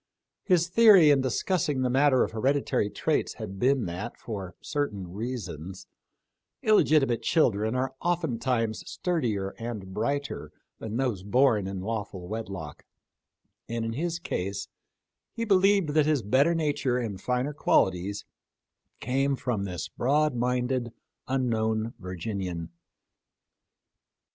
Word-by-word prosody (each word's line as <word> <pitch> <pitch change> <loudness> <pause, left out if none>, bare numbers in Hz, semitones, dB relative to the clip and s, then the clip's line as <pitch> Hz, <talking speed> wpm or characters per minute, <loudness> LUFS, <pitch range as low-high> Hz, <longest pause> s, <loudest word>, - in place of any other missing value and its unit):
His 175 -4 +2
theory 195 -5 +7
in 140 -2 +4
discussing 140 +2 0
the 125 - +1
matter 135 0 +4
of - - -3
hereditary 130 -1 +1
traits 155 +8 -1
had 100 -4 -7
been, 130 0 +2
that, 90 +7 -5
for 95 -5 -6
certain 105 - -3
reasons, 95 - -6 0.8
illegitimate 150 - +4
children 115 -5 +2
are 130 +1 -1
oftentimes 125 -9 0
sturdier 120 - -1
and 110 -5 -6
brighter 140 +7 -2 0.3
than 110 +1 -4
those 125 -8 -1
born 110 -1 +3
in 95 -1 -4
lawful 100 -4 -4
wedlock; 95 -8 -6 0.9
and 115 0 -2
in 115 - -2
his 170 +6 -2
case, 100 - -4 0.7
he 230 -1 -2
believed 195 -3 +4
that 150 0 +3
his 150 -6 +2
better 140 +10 +3
nature 145 -5 0
and 105 -6 -4
finer 125 +5 -1
qualities 100 -6 +1 0.7
came 135 +3 0
from 115 -6 -2
this 90 -3 -4
broad 150 +3 +1
minded, 125 0 0 0.4
unknown 115 -3 0
Virginian. 90 -2 -4
120 Hz, 120 wpm, -27 LUFS, 100-145 Hz, 0.9 s, theory